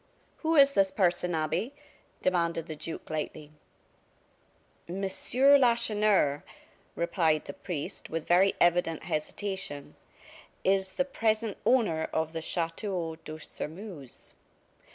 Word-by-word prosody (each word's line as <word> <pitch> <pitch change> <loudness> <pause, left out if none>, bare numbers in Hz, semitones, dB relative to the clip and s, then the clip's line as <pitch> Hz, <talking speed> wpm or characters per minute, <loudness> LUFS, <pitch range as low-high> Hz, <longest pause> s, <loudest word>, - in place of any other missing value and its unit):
"Who 325 0 0
is 280 -2 +7
this 195 -4 +3
person, 180 -3 +1
Abbe?" 160 - -1 0.5
demanded 170 -3 +1
the 160 -2 -6
duke, 160 +2 -7
lightly. 155 -1 -4 1.4
"Monsieur 210 +10 +3
Lacheneur," 215 - +3 0.5
replied 165 -3 +1
the - - -7
priest, 165 -7 -6
with 165 0 -4
very 185 +3 +4
evident 175 -2 +2
hesitation, 155 -2 -4 0.7
"is 190 0 +1
the 275 - 0
present 225 -4 0
owner 205 -11 +2
of 160 0 -1
the 165 - -3
Chateau 165 0 -2
de 155 0 -9
Sairmeuse." 160 - -9
175 Hz, 110 wpm, -29 LUFS, 160-210 Hz, 1.4 s, is